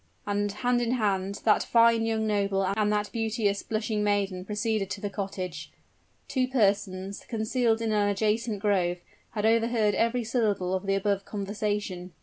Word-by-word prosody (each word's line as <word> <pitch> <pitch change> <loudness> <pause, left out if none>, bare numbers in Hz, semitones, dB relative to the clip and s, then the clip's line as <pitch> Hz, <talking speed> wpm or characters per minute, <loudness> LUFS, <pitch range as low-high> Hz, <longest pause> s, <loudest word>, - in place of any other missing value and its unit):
And, 205 0 0
hand 245 +4 0
in 240 0 0
hand, 200 -4 -1
that 215 - +4
fine 230 -1 +4
young 220 -1 0
noble 200 -2 +1
and 210 +2 +1
that 210 0 -1
beauteous, 220 -3 0
blushing 215 -1 -2
maiden 200 -3 0
proceeded 210 -1 -1
to 205 0 -4
the 205 0 -4
cottage. 185 -6 -5 0.6
Two 255 -2 0
persons, 200 -5 0
concealed 225 0 0
in 225 - 0
an 205 -1 +2
adjacent 215 +1 0
grove, 185 -4 +1 0.4
had 210 0 0
overheard 225 -1 +3
every 235 +3 +1
syllable 215 -6 0
of 190 +1 -2
the 195 - +2
above 195 0 0
conversation. 200 -3 -3
210 Hz, 155 wpm, -27 LUFS, 195-225 Hz, 0.6 s, that